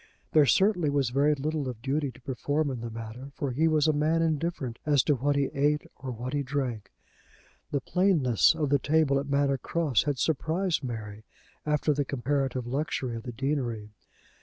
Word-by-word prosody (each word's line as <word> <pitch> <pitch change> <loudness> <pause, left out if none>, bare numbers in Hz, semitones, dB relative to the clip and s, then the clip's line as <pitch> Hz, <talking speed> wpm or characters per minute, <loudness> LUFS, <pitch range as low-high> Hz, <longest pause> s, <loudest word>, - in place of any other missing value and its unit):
There 150 -3 +5
certainly 185 - +3
was 140 -4 +1
very 145 +3 +3
little 145 -1 -2
of 120 -3 -7
duty 140 +2 0
to 125 +2 -18
perform 145 +3 -1
in 125 - -4
the 115 - -4
matter, 115 +4 -8
for 140 -3 -2
he 155 +6 +2
was 155 -1 +3
a 155 - +3
man 155 +3 +2
indifferent 155 -6 -2
as 145 -4 +3
to 150 - +3
what 140 +2 0
he 140 -1 +1
ate, 145 +2 +1
or 130 - -7
what 125 +2 -5
he 145 - +1
drank. 125 -6 -3 0.8
The 140 - -1
plainness 165 - +3
of 150 -3 -1
the 140 - +4
table 145 -1 +2
at 140 +1 -5
Manor 140 -1 +2
Cross 150 -5 0
had 145 -2 0
surprised 160 +4 0
Mary, 110 -4 -6 0.4
after 150 0 +2
the 145 0 0
comparative 135 -1 -1
luxury 130 -2 -2
of 115 - -5
the 125 - -6
deanery. 120 -5 -2
140 Hz, 185 wpm, -28 LUFS, 125-150 Hz, 0.8 s, There